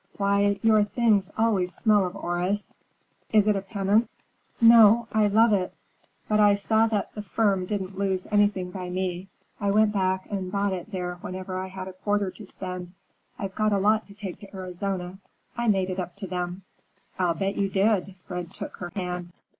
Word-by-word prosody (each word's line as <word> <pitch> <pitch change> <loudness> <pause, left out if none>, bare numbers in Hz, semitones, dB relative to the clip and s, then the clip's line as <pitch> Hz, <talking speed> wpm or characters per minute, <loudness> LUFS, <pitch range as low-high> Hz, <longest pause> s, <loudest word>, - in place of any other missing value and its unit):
Why, 200 0 +2
your 215 -2 +5
things 205 -3 +2
always 200 -5 +1
smell 210 -4 +3
of 180 - -8
orris; 180 +3 -2 0.6
is 215 -2 +5
it 210 - +4
a 195 - -1
penance?" 200 +3 +1 0.5
"No, 230 0 +7
I 215 -1 +3
love 220 +2 +4
it. 185 -2 -1 0.5
But 215 0 +2
I 205 -1 +6
saw 220 +2 +2
that 210 -3 -2
the 210 - -5
firm 195 -2 0
didn't 190 -2 -3
lose 190 -2 0
anything 205 -3 +2
by 180 -1 -6
me. 185 0 -3 0.3
I 200 -2 0
went 210 +1 +3
back 190 -1 0
and 190 -2 -3
bought 200 -1 0
it 185 +4 -6
there 180 -2 -4
whenever 185 0 -6
I 190 - -4
had 190 0 -7
a 190 - -8
quarter 205 0 -1
to 210 0 -12
spend. 180 -2 -7 0.4
I 195 - -3
got 215 +2 0
a - - +3
lot 215 +3 +2
to 200 - -13
take 200 -4 -6
to 200 -1 -12
Arizona. 185 0 -4 0.4
I 235 0 -1
made 190 -3 +2
it 185 - -4
up 180 -1 -5
to 200 0 -6
them." 180 +1 -4 0.6
"I'll 175 -2 +2
bet 195 +3 -1
you 195 -1 0
did!" 195 -1 +1
Fred 180 -1 -5
took - - -7
her 175 - -6
hand. 180 -2 -4
195 Hz, 190 wpm, -26 LUFS, 185-210 Hz, 0.6 s, No